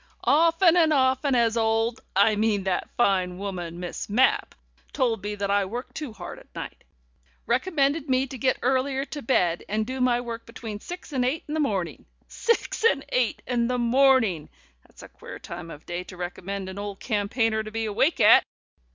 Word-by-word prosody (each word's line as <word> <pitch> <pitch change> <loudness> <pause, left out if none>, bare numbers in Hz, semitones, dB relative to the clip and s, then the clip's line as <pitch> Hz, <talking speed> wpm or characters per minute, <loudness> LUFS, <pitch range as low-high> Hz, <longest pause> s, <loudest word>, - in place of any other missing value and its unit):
Often 330 +3 +4
and 320 -2 +4
often 265 -1 +2
has 230 -2 +2
old 225 +1 +1
I 205 +2 +4
mean 210 -1 +1
has - - -11
that 190 -1 -1
fine 185 -5 +2
woman, 180 -4 -5
Miss 180 +2 -5
Mapp, 245 +6 +2 0.4
told 230 -5 0
me 210 +1 -4
that 200 -1 -2
I 200 0 +3
work 240 +7 -6
too 300 -6 -5
hard 220 - -9
at - - -18
night! - - -7 0.6
Recommended 285 +2 +1
me 260 0 +2
to 270 - -9
get 260 +1 +2
earlier 265 +2 +1
to 295 0 -7
bed, 180 -9 +1
and 215 +1 0
do 260 +2 -4
my 245 -1 +3
work 235 -2 -6
between 225 -2 -7
six 355 +3 -9
and 255 -2 +1
eight 265 +6 -1
in 300 - -5
the 315 - -1
morning! 195 - -2 0.2
Six 465 -1 -1
and 280 -12 +3
eight 250 -2 0
in 240 -2 0
the 250 0 0
morning! 240 - +3 0.4
That's - - -16
a - - -10
queer - - -11
time 165 - -8
of 150 -2 -11
day 175 +1 -4
to 180 - -11
recommend 185 +2 -5
an 190 +1 -7
old 205 -1 -6
campaigner 220 0 0
to 215 - -7
be 225 +1 -3
awake 220 +10 +1
at! - - +7
230 Hz, 195 wpm, -25 LUFS, 200-265 Hz, 0.6 s, at